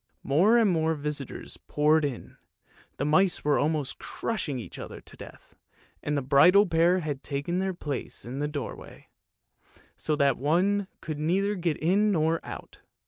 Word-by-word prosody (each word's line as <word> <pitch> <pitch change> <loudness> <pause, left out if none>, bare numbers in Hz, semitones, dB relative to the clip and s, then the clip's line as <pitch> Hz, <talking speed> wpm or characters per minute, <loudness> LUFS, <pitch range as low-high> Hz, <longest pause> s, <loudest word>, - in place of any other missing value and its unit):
More 185 +12 +4
and 230 -2 +4
more 160 -1 +1
visitors 145 -2 -4
poured 150 +1 +3
in, 140 -5 -5 0.6
the 140 - -1
mice 175 +5 +3
were 145 -1 +3
almost 150 -2 -1
crushing 180 - -3
each 120 - -8
other - - -8
to - - -11
death, - - -13 0.5
and 145 0 -1
the 140 - -1
bridal 180 +10 +6
pair 175 +1 +3
had 145 -4 -4
taken 145 +6 -2
their 190 -1 -1
place 145 -6 -5
in 125 +3 -6
the 150 - 0
doorway, 145 -2 -7 0.9
so 155 - -1
that 140 -3 +2
one 185 +8 +1
could 155 -2 -5
neither 190 +6 +1
get 170 -6 -1
in 200 +6 +2
nor 165 -2 +1
out. - - -9
155 Hz, 160 wpm, -27 LUFS, 145-180 Hz, 0.9 s, bridal